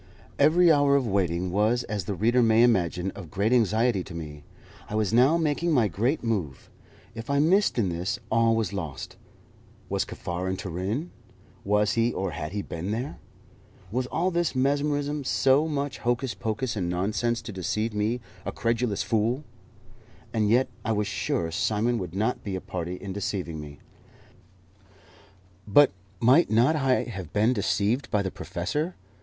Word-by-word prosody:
Every 165 +4 +6
hour 145 -2 +4
of 135 -2 +2
waiting 90 -4 0
was, 110 +5 +2
as 105 -4 -4
the 100 - -3
reader 120 +6 +3
may 115 0 +5
imagine, 95 -5 +2
of 90 -5 -10
great 100 +6 +1
anxiety 115 -3 +2
to 90 - -9
me. 75 -3 -7 0.5
I 105 - -4
was 110 -1 0
now 130 +8 +5
making 160 +1 0
my 120 -6 +4
great 120 +10 -1
move. 95 - -3 0.4
If 115 +2 -8
I 140 - +2
missed 180 +6 +3
in 105 -6 +2
this, 90 +4 -2
all 115 0 +3
was 110 -2 -1
lost. 80 -8 -5 0.7
Was - - 0
Kaffar 90 +2 -4
in 95 - -2
Turin? 100 - -3 0.5
Was 105 +1 +2
he 115 +1 +2
or 95 -4 -2
had 75 +1 -5
he 100 0 -3
been 85 +4 -5
there? 120 +7 -3 0.7
Was 125 +2 -1
all 180 +8 0
this 170 -4 0
mesmerism 145 +2 0
so 135 +3 +3
much 145 -2 -3
hocus 120 0 -1
pocus 115 +3 -3
and 90 -4 -2
nonsense 105 +6 0
to - - -6
deceive 105 +4 -2
me, 110 +4 -1 0.2
a - - -3
credulous 115 -3 -1
fool? 115 +6 0 0.9
And 110 -2 +1
yet 125 +4 +4 0.2
I 110 - 0
was 105 0 0
sure 85 -4 -2
Simon 110 +7 0
would 90 -2 -6
not 110 +5 -1
be 100 -2 -3
a - - -2
party 90 0 -4
in 95 +1 -7
deceiving 95 -5 -3
me. 75 -1 -10 1.9
But 140 +7 +6 0.3
might 130 - +5
not 120 +8 +4
I 135 -4 +2
have 95 -8 -7
been 110 +4 +3
deceived 110 +4 0
by 105 -1 +1
the 95 - -3
professor? 150 - -3
110 Hz, 165 wpm, -26 LUFS, 95-130 Hz, 1.9 s, Every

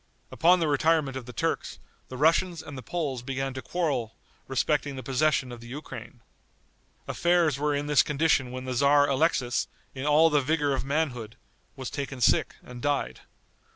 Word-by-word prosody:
Upon 180 +3 +4
the 165 - +1
retirement 150 -1 +2
of 130 -2 -6
the - - -7
Turks, - - -2 0.3
the 130 - -8
Russians 165 +3 +2
and 145 - -9
the 130 - -7
Poles 145 -6 -3
began 135 +1 -3
to 130 - -6
quarrel 140 -11 -2 0.3
respecting 145 +1 0
the 130 - -7
possession 135 -1 +1
of 120 -1 -9
the 120 - -11
Ukraine. 130 -2 -9 0.9
Affairs 170 -5 +2
were 150 0 +1
in 145 +1 -2
this 150 -2 +5
condition 150 -3 +1
when 130 +1 -6
the 130 - -3
tzar 145 +3 +4
Alexis, 135 -3 +1 0.3
in 135 +2 -4
all 155 +2 +5
the 150 -1 +3
vigor 145 0 +1
of 135 - -2
manhood, 135 -6 -2 0.4
was 130 -3 -6
taken 140 -2 -5
sick 120 - +2
and 125 -1 -10
died. 145 0 -1
140 Hz, 175 wpm, -27 LUFS, 130-155 Hz, 0.9 s, this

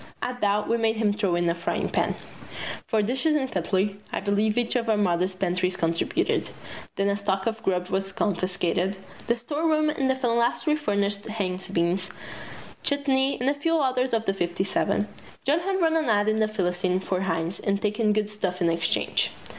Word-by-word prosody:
At 250 0 -4
that 205 0 +2
we 230 - +2
made 225 -1 +2
him 215 -2 +2
throw 200 -4 0
in 175 0 +1
a 170 - +3
frying 170 0 -2
pan. - - 0 0.7
For 220 -1 +2
dishes 265 +8 +1
and 265 -3 0
cutlery, 190 +3 0
I - - -1
believe 210 +2 +1
each 240 +1 0
of 235 -2 0
our 215 - +3
mothers' 185 -1 +1
pantries 185 0 0
contributed. 165 0 0 0.5
Then 195 - +1
a 200 - +2
stock 195 -1 -1
of 225 -1 -1
grub 180 -4 0
was 195 0 -1
confiscated. 185 0 0 0.3
The 235 - +2
storeroom 305 +4 +1
in 275 -3 0
the 265 - +2
Phalansterie 245 +4 +1
furnished 200 -5 -1
Heinz 190 -4 -3
beans, 185 +1 0 0.7
chutney, 280 -1 +2
and 250 - -1
a 280 - +4
few 330 +3 0
others 260 -4 +1
of 225 -1 0
the 195 - +1
fifty 175 -1 -1
seven. 200 +1 0 0.4
John 295 +4 +3
had 385 +2 -1
run 325 -2 +3
an 320 -1 +2
ad 205 -1 +3
in 215 0 +2
"The 215 - +3
Philistine" 185 -2 0
for 185 -1 -2
Heinz 165 -1 -1
and 200 0 0
taken 210 +1 +1
good 210 0 0
stuff 185 -4 -2
in 170 -2 +3
exchange. 165 0 +1
205 Hz, 190 wpm, -26 LUFS, 185-245 Hz, 0.7 s, a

